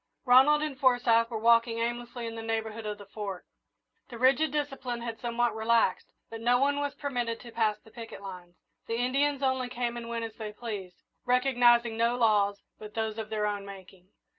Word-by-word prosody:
Ronald 270 Hz, +4 st, +6 dB
and 285 Hz, -4 st, -4 dB
Forsyth 245 Hz, -3 st, +3 dB
were 230 Hz, -, -3 dB
walking 230 Hz, +1 st, +3 dB
aimlessly 240 Hz, +1 st, -3 dB
in 230 Hz, -, -5 dB
the 225 Hz, -, -6 dB
neighbourhood 225 Hz, -1 st, -3 dB
of 210 Hz, 0 st, -4 dB
the 205 Hz, -, -12 dB
Fort. 195 Hz, -2 st, -6 dB, 0.6 s
The 240 Hz, -, -8 dB
rigid 270 Hz, +5 st, +3 dB
discipline 270 Hz, -5 st, -3 dB
had 230 Hz, -1 st, -5 dB
somewhat 240 Hz, 0 st, 0 dB
relaxed, 225 Hz, +1 st, +2 dB, 0.2 s
but 225 Hz, 0 st, -8 dB
no 245 Hz, +2 st, +4 dB
one 285 Hz, +2 st, +1 dB
was 285 Hz, -1 st, -2 dB
permitted 245 Hz, -5 st, -3 dB
to 240 Hz, -, -11 dB
pass 220 Hz, -2 st, +1 dB
the 220 Hz, -, -20 dB
picket 230 Hz, 0 st, -9 dB
lines. 180 Hz, -2 st, -9 dB, 0.3 s
The 230 Hz, -, -1 dB
Indians 275 Hz, +3 st, +1 dB
only 260 Hz, -1 st, 0 dB
came 240 Hz, -1 st, -3 dB
and 230 Hz, -1 st, -7 dB
went 230 Hz, -1 st, -2 dB
as 225 Hz, -, -8 dB
they 215 Hz, -1 st, -5 dB
pleased, 205 Hz, -5 st, -7 dB, 0.2 s
recognising 245 Hz, -2 st, +3 dB
no 235 Hz, +1 st, +2 dB
laws 205 Hz, -4 st, +2 dB, 0.2 s
but 210 Hz, -1 st, -10 dB
those 220 Hz, -1 st, -2 dB
of 220 Hz, -1 st, -5 dB
their 215 Hz, -1 st, -1 dB
own 205 Hz, -1 st, -2 dB
making. 190 Hz, -2 st, -12 dB
230 Hz, 190 wpm, -29 LUFS, 220-250 Hz, 0.6 s, Ronald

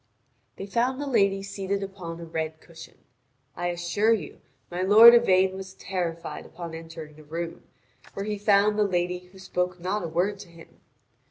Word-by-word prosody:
They 195 Hz, -, -6 dB
found 240 Hz, +6 st, 0 dB
the 290 Hz, -, -3 dB
lady 200 Hz, -7 st, +2 dB
seated 195 Hz, 0 st, -3 dB
upon 180 Hz, -4 st, -7 dB
a 170 Hz, -, -7 dB
red 160 Hz, -1 st, -4 dB
cushion. 165 Hz, -1 st, -14 dB, 0.6 s
I 175 Hz, -, -2 dB
assure 175 Hz, +5 st, +1 dB
you 185 Hz, -10 st, -5 dB, 0.3 s
my 175 Hz, +1 st, -3 dB
lord 215 Hz, +5 st, +9 dB
Yvain 190 Hz, -5 st, +4 dB
was 190 Hz, 0 st, -8 dB
terrified 170 Hz, -3 st, -4 dB
upon 170 Hz, 0 st, -9 dB
entering 160 Hz, -2 st, -9 dB
the 155 Hz, -, -14 dB
room, 165 Hz, +2 st, -6 dB, 0.5 s
where 195 Hz, -, -3 dB
he 210 Hz, -1 st, -3 dB
found 205 Hz, +1 st, +3 dB
the -, -, +5 dB
lady 180 Hz, -1 st, -1 dB
who 190 Hz, -, -16 dB
spoke 180 Hz, -1 st, -2 dB
not 190 Hz, +4 st, -2 dB
a 170 Hz, -, -3 dB
word 180 Hz, +5 st, -1 dB
to 195 Hz, -3 st, -11 dB
him. 165 Hz, -1 st, -17 dB
185 Hz, 175 wpm, -26 LUFS, 170-200 Hz, 0.6 s, lord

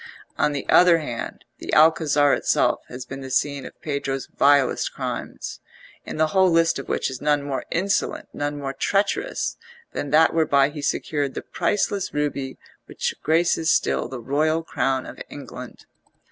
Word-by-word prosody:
On -, -, +2 dB
the 140 Hz, -1 st, -4 dB
other 175 Hz, -1 st, +6 dB
hand, 120 Hz, -8 st, -6 dB
the -, -, -6 dB
Alcazar 150 Hz, -2 st, +5 dB
itself -, -, +2 dB
has 125 Hz, +1 st, -8 dB
been 135 Hz, +1 st, -7 dB
the 130 Hz, -, -7 dB
scene 140 Hz, +1 st, 0 dB
of -, -, -15 dB
Pedro's 140 Hz, -3 st, -3 dB
vilest 140 Hz, -2 st, +3 dB
crimes, -, -, -5 dB, 0.5 s
in -, -, -6 dB
the 155 Hz, 0 st, +2 dB
whole 190 Hz, -1 st, +5 dB
list 165 Hz, -3 st, +3 dB
of 135 Hz, -, -8 dB
which -, -, -1 dB
is 130 Hz, -, -7 dB
none 145 Hz, -1 st, +2 dB
more 140 Hz, -2 st, -3 dB
insolent, 195 Hz, +3 st, -1 dB
none 145 Hz, 0 st, -3 dB
more 135 Hz, -1 st, -4 dB
treacherous, 200 Hz, -, -1 dB, 0.4 s
than 145 Hz, -, -3 dB
that 160 Hz, +3 st, +5 dB
whereby 145 Hz, -4 st, +3 dB
he 150 Hz, 0 st, -7 dB
secured 145 Hz, -1 st, -1 dB
the -, -, -4 dB
priceless 200 Hz, -2 st, -1 dB
ruby 140 Hz, -2 st, -2 dB, 0.3 s
which -, -, -2 dB
graces 160 Hz, 0 st, +2 dB
still -, -, +2 dB
the 130 Hz, 0 st, -7 dB
royal 155 Hz, +6 st, 0 dB
crown 135 Hz, -4 st, -1 dB
of -, -, -10 dB
England. 125 Hz, -3 st, -10 dB
145 Hz, 160 wpm, -23 LUFS, 135-160 Hz, 0.5 s, other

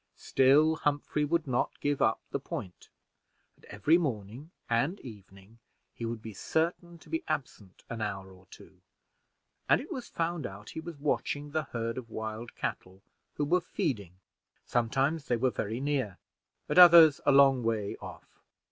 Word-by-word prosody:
Still 150 Hz, +4 st, +4 dB
Humphrey 150 Hz, 0 st, -1 dB
would 165 Hz, +2 st, 0 dB
not 125 Hz, -3 st, -1 dB
give 145 Hz, -1 st, -1 dB
up 110 Hz, -, +3 dB
the -, -, -1 dB
point, 90 Hz, -2 st, -8 dB, 0.7 s
and -, -, -22 dB
every 165 Hz, +3 st, +2 dB
morning 125 Hz, -, -4 dB, 0.2 s
and 135 Hz, -, 0 dB
evening 100 Hz, -1 st, -13 dB, 0.3 s
he 115 Hz, -, -6 dB
would 115 Hz, -1 st, -5 dB
be 110 Hz, -, -7 dB
certain 170 Hz, -, -2 dB
to -, -, -19 dB
be 325 Hz, +1 st, -3 dB
absent 105 Hz, -8 st, -5 dB
an 115 Hz, -1 st, -6 dB
hour 95 Hz, -2 st, -4 dB
or 95 Hz, 0 st, -18 dB
two, -, -, -16 dB, 0.9 s
and -, -, +5 dB
it 275 Hz, -, -9 dB
was 255 Hz, -3 st, -5 dB
found 165 Hz, -4 st, -2 dB
out 100 Hz, +2 st, -11 dB
he -, -, -6 dB
was 165 Hz, -1 st, -8 dB
watching 145 Hz, 0 st, -2 dB
the 155 Hz, 0 st, -1 dB
herd 115 Hz, +1 st, -4 dB
of 115 Hz, -2 st, -12 dB
wild 110 Hz, +2 st, -6 dB
cattle 95 Hz, +1 st, -5 dB, 0.3 s
who 145 Hz, -, -1 dB
were 180 Hz, +5 st, +2 dB
feeding: 120 Hz, -, -3 dB, 0.5 s
sometimes 135 Hz, +6 st, 0 dB
they 120 Hz, -, +1 dB
were 130 Hz, +2 st, +1 dB
very 110 Hz, +2 st, -3 dB
near, 135 Hz, -9 st, -1 dB, 0.5 s
at -, -, +3 dB
others 170 Hz, -4 st, +9 dB
a -, -, +7 dB
long 135 Hz, -2 st, +6 dB
way 110 Hz, -3 st, -1 dB
off. -, -, -12 dB
130 Hz, 165 wpm, -30 LUFS, 110-155 Hz, 0.9 s, others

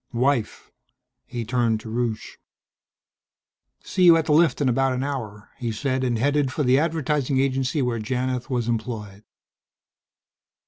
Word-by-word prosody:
"Wife." 125 Hz, -2 st, -1 dB, 0.6 s
He 120 Hz, -2 st, -5 dB
turned 115 Hz, -2 st, +1 dB
to -, -, -10 dB
Rusche. 115 Hz, -2 st, -3 dB, 1.4 s
"See 185 Hz, -, -1 dB
you 170 Hz, -1 st, +8 dB
at 160 Hz, -, 0 dB
the 155 Hz, -, -1 dB
lift 160 Hz, +1 st, +4 dB
in 145 Hz, -, +1 dB
about 135 Hz, +1 st, +2 dB
an 130 Hz, +1 st, -2 dB
hour," 110 Hz, -7 st, -5 dB
he 120 Hz, -2 st, -2 dB
said 130 Hz, +3 st, -1 dB
and 120 Hz, -2 st, 0 dB
headed 140 Hz, +2 st, +1 dB
for 150 Hz, -, -1 dB
the 130 Hz, +1 st, +4 dB
advertising 150 Hz, -4 st, 0 dB
agency 135 Hz, +1 st, 0 dB
where 120 Hz, -2 st, -1 dB
Janith 125 Hz, +4 st, -2 dB
was 120 Hz, -3 st, -1 dB
employed. 110 Hz, -3 st, -4 dB
130 Hz, 145 wpm, -24 LUFS, 115-140 Hz, 1.4 s, you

